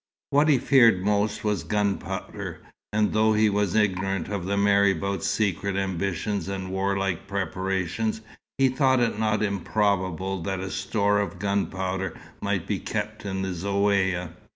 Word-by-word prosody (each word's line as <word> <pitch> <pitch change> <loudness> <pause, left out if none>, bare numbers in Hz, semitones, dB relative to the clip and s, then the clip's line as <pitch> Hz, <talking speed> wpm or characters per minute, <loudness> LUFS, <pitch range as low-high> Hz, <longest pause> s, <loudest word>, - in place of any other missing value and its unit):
What 145 +2 +4
he 145 - +6
feared 115 -8 +4
most 105 0 +1
was 105 -5 0
gunpowder; 100 +3 -3 0.3
and 105 0 +1
though 110 0 +4
he 110 0 +3
was 100 -2 0
ignorant 95 -3 0
of 100 -4 -3
the 100 +1 0
marabout's 100 -2 +2
secret 100 -2 0
ambitions 95 0 -2
and 95 -1 -4
warlike 95 -1 -1
preparations, 95 +2 -2 0.4
he 135 0 +4
thought 130 0 +3
it 115 -3 0
not 110 -1 +1
improbable 95 -2 0
that 95 +2 -2
a 95 0 -4
store 100 +4 +1
of 100 - -3
gunpowder 95 -2 -2 0.3
might - - -1
be - - -2
kept - - -4
in 95 -1 -2
the 95 - -2
Zaouïa. 95 -1 0
100 Hz, 145 wpm, -25 LUFS, 95-105 Hz, 0.4 s, he